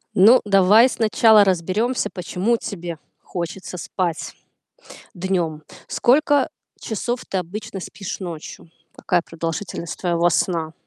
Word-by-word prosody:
Ну, 225 Hz, +7 st, +7 dB
давай 205 Hz, +4 st, +6 dB
сначала 220 Hz, -2 st, +5 dB
разберёмся, 200 Hz, +6 st, 0 dB
почему 190 Hz, +5 st, -1 dB
тебе 175 Hz, -6 st, -6 dB, 0.2 s
хочется 180 Hz, +1 st, -6 dB
спать 175 Hz, -1 st, -3 dB, 0.8 s
днём. 175 Hz, -4 st, -2 dB, 0.3 s
Сколько 285 Hz, +2 st, +3 dB, 0.3 s
часов 240 Hz, +3 st, -3 dB
ты 190 Hz, -, -1 dB
обычно 200 Hz, +3 st, -6 dB
спишь 195 Hz, +2 st, -7 dB
ночью? 170 Hz, -2 st, -8 dB, 0.2 s
Какая 175 Hz, -, 0 dB
продолжительность 165 Hz, +1 st, -5 dB
твоего 175 Hz, -1 st, +1 dB
сна? 160 Hz, -1 st, 0 dB
190 Hz, 105 wpm, -21 LUFS, 170-215 Hz, 0.8 s, Ну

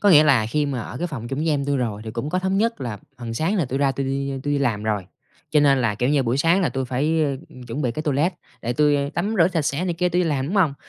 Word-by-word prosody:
có 205 Hz, -, +5 dB
nghĩa 155 Hz, -3 st, +8 dB
là 125 Hz, -7 st, +4 dB
khi 150 Hz, +6 st, 0 dB
mà 135 Hz, -4 st, -2 dB
ở -, -, -7 dB
cái 175 Hz, -, -1 dB
phòng 120 Hz, -7 st, -6 dB
chung 135 Hz, -, -3 dB
với 160 Hz, +2 st, 0 dB
em 145 Hz, -3 st, +1 dB
tui 140 Hz, 0 st, 0 dB
rồi 115 Hz, -5 st, -2 dB
thì 110 Hz, -, -5 dB
cũng 120 Hz, +6 st, -4 dB
có 185 Hz, -, +1 dB
thống 190 Hz, +1 st, 0 dB
nhất 230 Hz, -, 0 dB
là 115 Hz, -5 st, -4 dB, 0.2 s
phần 115 Hz, -2 st, -5 dB
sáng 170 Hz, -, 0 dB
là 170 Hz, -, +2 dB
tui 130 Hz, +2 st, -3 dB
ra 140 Hz, -1 st, +2 dB
tui 135 Hz, 0 st, -3 dB
đi 140 Hz, +1 st, -2 dB
tui 145 Hz, -, -1 dB
đi 145 Hz, -, +2 dB
làm 115 Hz, -7 st, 0 dB
rồi, 105 Hz, -4 st, -1 dB, 0.4 s
cho 150 Hz, -1 st, +4 dB
nên 140 Hz, -2 st, +4 dB
là, 115 Hz, -3 st, +1 dB
kiểu 125 Hz, +5 st, 0 dB
như, 145 Hz, -2 st, +3 dB
buổi 120 Hz, +1 st, 0 dB
sáng 165 Hz, +6 st, +3 dB
là 180 Hz, -, +2 dB
tui 135 Hz, -1 st, -2 dB
phải, 150 Hz, +6 st, +1 dB
ơ, 140 Hz, -2 st, -1 dB, 0.3 s
chuẩn 120 Hz, +6 st, -4 dB
bị 125 Hz, -, +1 dB
cái 155 Hz, -, -4 dB
toilet 150 Hz, +5 st, +1 dB, 0.3 s
để 120 Hz, -, -1 dB
tui 145 Hz, +1 st, +2 dB
tắm 200 Hz, +8 st, -1 dB
rửa 165 Hz, 0 st, +6 dB
sạch 165 Hz, -4 st, 0 dB
sẽ 145 Hz, +5 st, -1 dB
này 175 Hz, -, -1 dB
kia 180 Hz, +1 st, +1 dB
tui 180 Hz, +1 st, +1 dB
đi 170 Hz, -, 0 dB
làm, 135 Hz, -2 st, 0 dB
đúng 180 Hz, -, -3 dB
hông? 160 Hz, -8 st, +3 dB
140 Hz, 320 wpm, -23 LUFS, 125-165 Hz, 0.4 s, nghĩa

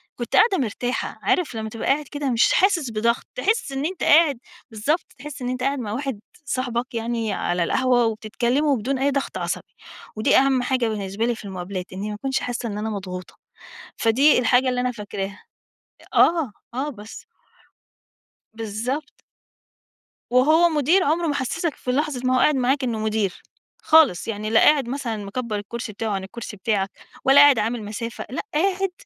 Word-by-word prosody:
كُنت 240 Hz, -, -3 dB
قاعدة 430 Hz, -2 st, +5 dB
مرتاحة. 245 Hz, +1 st, -3 dB
عارف 335 Hz, -9 st, 0 dB
لمّا 220 Hz, 0 st, -4 dB
تبقى 225 Hz, +1 st, -5 dB
قاعد 290 Hz, +2 st, +2 dB
كده 290 Hz, -2 st, -2 dB
مش 235 Hz, -1 st, +3 dB
حاسس 350 Hz, -, +2 dB
بضغط، 230 Hz, +2 st, 0 dB
تحس 435 Hz, -, 0 dB
إن 270 Hz, +1 st, -2 dB
أنت 360 Hz, +2 st, -3 dB
قاعد 295 Hz, -5 st, +5 dB, 0.3 s
بالضبط، 255 Hz, +10 st, 0 dB
تحس 295 Hz, -2 st, -9 dB
إن 250 Hz, -, -2 dB
أنت 255 Hz, 0 st, -3 dB
قاعد 275 Hz, 0 st, 0 dB
مع 215 Hz, -4 st, -4 dB
واحد 265 Hz, -2 st, -3 dB, 0.3 s
صاحبك 245 Hz, -2 st, -2 dB
يعني 230 Hz, -2 st, -2 dB
على 175 Hz, -2 st, 0 dB
القهوة 245 Hz, +5 st, +2 dB
وبتتكلموا 240 Hz, +6 st, 0 dB
بدون 260 Hz, +5 st, -2 dB
أي 280 Hz, +1 st, +2 dB
ضغط 275 Hz, 0 st, -2 dB
عصبي، -, -, -4 dB, 0.4 s
ودي 215 Hz, -, +3 dB
أهم 265 Hz, -1 st, +3 dB
حاجة 255 Hz, -2 st, +1 dB
بالنسبة 205 Hz, 0 st, -2 dB
لي 240 Hz, -1 st, 0 dB
في 215 Hz, -, -11 dB
المُقابلات 185 Hz, -1 st, -5 dB
إنّي 200 Hz, +3 st, -4 dB
ما 210 Hz, -, -4 dB
أكُونش 265 Hz, +4 st, -1 dB
حاسّة 245 Hz, -1 st, -4 dB
إن 205 Hz, -, -5 dB
أنا 215 Hz, +1 st, -3 dB
مضغوطة. 185 Hz, -3 st, -6 dB, 0.6 s
فدي 260 Hz, +7 st, +4 dB
الحاجة 250 Hz, +1 st, +3 dB
اللي 250 Hz, -1 st, 0 dB
أنا 250 Hz, 0 st, 0 dB
فاكراها. 200 Hz, -3 st, -6 dB, 0.7 s
آه، 325 Hz, -8 st, +4 dB, 0.2 s
آه، 275 Hz, +4 st, -1 dB
بس. 220 Hz, -5 st, -10 dB, 1.3 s
بالضبط. 230 Hz, +7 st, -4 dB, 1.1 s
وهو 310 Hz, +7 st, +5 dB
مُدير 320 Hz, +5 st, +3 dB
عمره 330 Hz, +2 st, +1 dB
ما 290 Hz, -, 0 dB
حسّسك 295 Hz, +4 st, -2 dB
في 250 Hz, -, -3 dB
لحظة 285 Hz, -1 st, -1 dB
ما 255 Hz, 0 st, +3 dB
هو -, -, +3 dB
قاعد 300 Hz, +3 st, +4 dB
معاك 265 Hz, +2 st, +1 dB
إنّه 235 Hz, -3 st, -1 dB
مُدير، 215 Hz, -3 st, -1 dB, 0.4 s
خالص 310 Hz, -, +4 dB
يعني 215 Hz, -1 st, -3 dB
لا 225 Hz, -, +5 dB
قاعد 285 Hz, -5 st, +4 dB
مثلًا 250 Hz, -4 st, -3 dB
مكبّر 225 Hz, +2 st, -4 dB
الكرسي 215 Hz, +2 st, -5 dB
بتاعه 220 Hz, +2 st, -3 dB
عن 195 Hz, -1 st, -2 dB
الكرسي 210 Hz, +2 st, -8 dB
بتاعك، 195 Hz, -1 st, 0 dB, 0.4 s
ولا 275 Hz, +1 st, +7 dB
قاعد 285 Hz, -5 st, +7 dB
عامل 225 Hz, +1 st, -1 dB
مسافة. 225 Hz, +3 st, -5 dB
لأ، 260 Hz, -, -3 dB
قاعد 380 Hz, +4 st, +1 dB
245 Hz, 175 wpm, -23 LUFS, 220-280 Hz, 1.3 s, ولا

